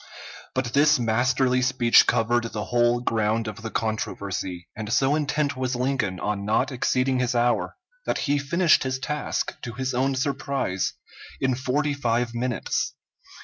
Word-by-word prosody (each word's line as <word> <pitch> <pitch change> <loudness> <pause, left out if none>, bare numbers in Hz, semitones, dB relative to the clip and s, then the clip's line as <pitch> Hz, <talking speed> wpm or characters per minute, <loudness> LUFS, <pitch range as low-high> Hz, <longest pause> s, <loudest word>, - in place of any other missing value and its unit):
But 130 -3 -1
this 150 +2 +5
masterly 125 +2 +2
speech 125 -2 +5
covered 120 +1 +2
the 105 - -3
whole 120 0 +3
ground 110 -1 0
of 105 +1 -6
the 110 - -5
controversy, 100 -5 -3
and 110 0 -5
so 135 +4 +3
intent 150 -1 0
was 130 0 -2
Lincoln 125 -7 -1
on 105 +1 -2
not 110 +6 +1
exceeding 130 +1 +1
his 125 0 0
hour 120 +1 +1 0.3
that - - 0
he 145 0 +2
finished 165 +4 +3
his 130 0 -1
task, 150 +3 -3
to 120 - -6
his 130 +2 -3
own 135 +2 +1
surprise, 135 - -1 0.5
in 130 -1 +1
forty 140 +4 0
five 120 -3 0
minutes. 120 0 -2
125 Hz, 150 wpm, -25 LUFS, 115-135 Hz, 0.5 s, this